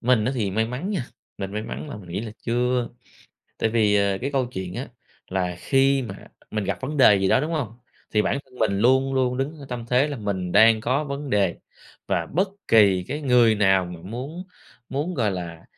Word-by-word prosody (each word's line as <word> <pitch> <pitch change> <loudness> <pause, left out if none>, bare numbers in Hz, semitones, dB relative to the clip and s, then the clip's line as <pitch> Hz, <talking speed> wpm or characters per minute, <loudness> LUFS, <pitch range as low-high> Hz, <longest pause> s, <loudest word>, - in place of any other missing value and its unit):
mình 120 -3 +3
á 130 - 0
thì 105 -6 -1
may 110 +3 +1
mắn 125 - -4
nha, 170 - -2 0.3
mình 95 -1 -4
may 105 +1 -3
mắn 70 - -6
là - - -6
mình 95 -4 -12
nghĩ 95 +4 -3
là 110 -2 -6
chưa, 125 0 0 0.7
tại 110 - +1
vì, 105 -3 +3
ờ, 100 -1 +2
cái 140 +3 -2
câu 130 -2 +1
chuyện 95 -7 -6
á, - - -5 0.4
là 90 -2 -2
khi 135 0 +2
mà 100 -5 -8 0.2
mình 110 -1 -2
gặp 100 0 -2
vấn 145 +3 -4
đề 115 -6 +7
gì 95 - +1
đó, 130 - +4
đúng 155 +4 -2
hông? 140 -9 -2 0.4
Thì 105 -1 +2
bản - - 0
thân 130 - -23
mình 100 -2 +1
luôn 130 +4 +3
luôn 125 -1 +1
đứng 145 +4 -3
ở 140 - -10
tâm 120 -2 -5
thế 125 +5 +3
là 145 - -4
mình 95 -5 -3
đang 110 +1 +6
có 135 +6 0
vấn 140 -1 -5
đề, 100 -4 +2 0.5
và 85 - 0
bất 190 +5 0 0.2
kỳ 100 -5 +5
cái 145 +3 -3
người 125 -5 +4
nào 95 -3 +3
mà 90 -1 -9
muốn 130 - -6 0.5
muốn, 150 +7 -2
gọi 110 -8 +1
là, 85 -3 -6
115 Hz, 225 wpm, -24 LUFS, 100-135 Hz, 0.7 s, đề